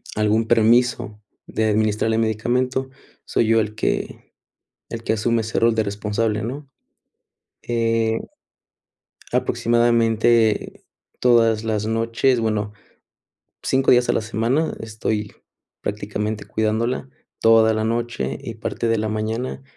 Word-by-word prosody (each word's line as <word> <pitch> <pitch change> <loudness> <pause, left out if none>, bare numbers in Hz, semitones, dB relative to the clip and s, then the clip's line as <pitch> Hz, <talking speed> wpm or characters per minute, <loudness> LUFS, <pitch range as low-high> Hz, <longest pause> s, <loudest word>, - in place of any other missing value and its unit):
algún 110 +1 +1
permiso 115 -2 +2 0.3
de 110 - -1
administrarle 110 +1 +1
medicamento, 125 +4 0 0.4
soy 115 - +1
yo 115 0 +4
el 110 0 -4
que 110 - -2 0.7
el 115 0 -5
que 110 - +1
asume 115 +1 +1
ese 110 0 -2
rol 115 0 +3
de 110 -1 +1
responsable, 105 +1 -1
¿no? 135 +5 -6 0.9
Eh, 115 -1 0 1.1
aproximadamente 115 -1 +2 0.4
todas 115 -3 +4
las 110 -1 -1
noches 115 +3 +1
bueno, 105 -1 -1 0.9
5 130 0 +1
días 125 -1 +4
a - - +4
la - - +1
semana 115 +8 -1
estoy 110 -1 -3 0.5
prácticamente 105 +1 -3
cuidándola 115 +4 -1 0.3
toda 110 0 +5
la 110 0 -1
noche, 115 - -2
y - - -7
parte 115 - -3
de 115 - +2
la 110 +1 -1
mañana. 110 +5 -3
115 Hz, 120 wpm, -21 LUFS, 110-120 Hz, 1.1 s, toda